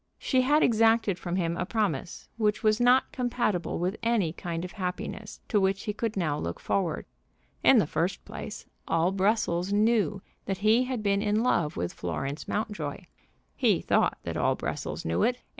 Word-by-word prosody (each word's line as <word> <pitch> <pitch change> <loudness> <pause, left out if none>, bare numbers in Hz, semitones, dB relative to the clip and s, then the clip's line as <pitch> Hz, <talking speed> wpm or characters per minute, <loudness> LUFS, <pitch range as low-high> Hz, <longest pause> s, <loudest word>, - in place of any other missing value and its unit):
She 260 -2 +2
had 295 +4 +3
exacted 225 -4 +3
from 175 -1 -3
him 170 -2 0
a 180 - -1
promise 190 - -2
which 215 -1 +1
was 215 +1 +3
not 250 +2 +4
compatible 240 -8 -1
with 180 +4 -1
any 225 -8 +1
kind 170 0 -4
of 180 - -8
happiness 200 +2 -5
to 205 - +3
which 195 0 +1
he 210 - -2
could 220 0 -3
now 155 -5 0
look 85 - -4
forward. 175 -6 -1 0.6
In - - +7
the - - +4
first - - -2
place, - - -7 0.2
all 165 +2 +2
Brussels 195 -2 +1
knew 210 -2 +2 0.2
that 195 - -2
he 230 +4 +5
had 250 -4 -3
been 200 -1 +2
in 215 +1 +1
love 170 -11 +1
with 85 0 -2
Florence 135 - -4
Mountjoy. 205 -9 -3 0.5
He - - +3
thought - - +1
that - - -4
all - - +2
Brussels - - -4
knew 80 +1 0
it. 245 +1 +2
200 Hz, 175 wpm, -28 LUFS, 175-225 Hz, 0.6 s, In